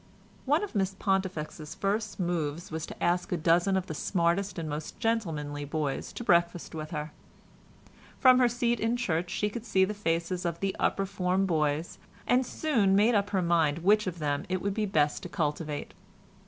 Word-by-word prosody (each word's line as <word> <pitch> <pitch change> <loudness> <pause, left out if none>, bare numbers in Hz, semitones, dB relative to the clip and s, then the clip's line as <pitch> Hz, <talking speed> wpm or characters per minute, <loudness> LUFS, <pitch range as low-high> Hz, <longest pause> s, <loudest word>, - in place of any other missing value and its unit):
One 295 +7 +2
of 415 - -5
Miss 195 -2 0
Pontifex's 185 -6 -2
first 205 +1 -2
moves 170 -3 -2
was 160 0 -4
to - - -8
ask 175 +1 +1
a 180 - +1
dozen 175 +4 +3
of 185 - -1
the 160 - -5
smartest 180 +4 0
and 165 -2 -3
most 150 +4 -5
gentlemanly 160 -11 -1
boys 145 -1 -3
to - - -6
breakfast 170 -3 +2
with 155 -1 -5
her. 150 -1 -4 1.1
From 255 -1 +6
her 250 - +5
seat 240 -1 0
in 230 +2 +1
church 175 -7 -1
she 200 +3 0
could 220 +2 -5
see 190 -4 +3
the 210 - -3
faces 175 -2 -1
of 170 -1 -2
the 195 -1 -1
upper 195 - +1
form 190 0 0
boys, 155 -2 0 0.3
and 250 +1 +3
soon 225 -11 +2
made 215 +4 +4
up 205 -1 +2
her 190 -3 0
mind 165 -2 +2
which 210 +2 +4
of 175 -2 -3
them 145 -2 -1
it 185 0 0
would 200 +2 -1
be 215 0 -1
best 150 -6 +1
to 180 - -7
cultivate. 150 -2 -3
180 Hz, 190 wpm, -29 LUFS, 160-205 Hz, 1.1 s, From